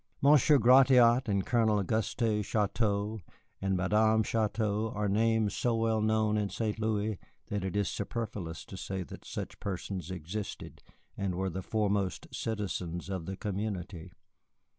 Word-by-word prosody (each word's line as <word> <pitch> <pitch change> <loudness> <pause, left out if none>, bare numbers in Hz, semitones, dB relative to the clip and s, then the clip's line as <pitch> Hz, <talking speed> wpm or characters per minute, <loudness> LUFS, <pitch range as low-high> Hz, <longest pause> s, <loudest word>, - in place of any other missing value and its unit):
Monsieur 145 +1 +6
Gratiot 125 -1 +6
and 100 -2 0
Colonel 110 -3 +2
Auguste 110 +2 0
Chouteau 105 0 0 0.4
and 95 -1 0
Madame 110 +4 +3
Chouteau 110 0 0
are 105 0 0
names 110 +1 +2
so 120 -2 +1
well 115 -1 +1
known 110 0 +2
in 100 -1 -1
St. 110 0 -2
Louis 110 -2 -1 0.3
that 100 -2 -2
it 95 0 -3
is 105 -1 +1
superfluous 100 -6 -4
to 95 - -9
say 95 0 -4
that - - -11
such - - -6
persons 95 -2 -4
existed 95 +3 -6 0.3
and 100 -3 -2
were 95 +1 -1
the 95 - -4
foremost 100 -1 -1
citizens 95 -5 -3
of 95 -4 -4
the 95 0 -4
community. 100 -4 -4
105 Hz, 140 wpm, -30 LUFS, 95-110 Hz, 0.4 s, Monsieur